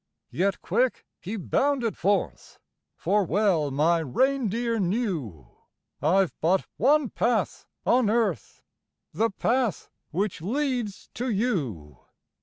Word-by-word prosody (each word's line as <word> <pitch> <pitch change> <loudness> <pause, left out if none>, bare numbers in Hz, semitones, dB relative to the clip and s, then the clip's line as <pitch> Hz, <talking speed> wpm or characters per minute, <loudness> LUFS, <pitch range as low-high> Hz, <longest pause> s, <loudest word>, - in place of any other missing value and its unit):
Yet 195 +2 0
quick 255 0 0
he 200 +6 -5
bounded 255 +3 0
forth; 200 +3 -1 0.4
For 205 0 +1
well 185 -6 +2
my 155 +5 +2
reindeer 230 - 0
knew 175 - -2 0.5
I've 180 +5 +3
but 180 +4 +2
one 280 +2 +3
path 240 +1 0 0.2
on 245 -3 +3
earth 230 0 -1 0.5
The 225 +1 +1
path 230 - -1 0.2
which 190 +1 -2
leads 245 - -2
to 250 +2 -3
you. 145 - -2
205 Hz, 105 wpm, -26 LUFS, 170-240 Hz, 0.5 s, I've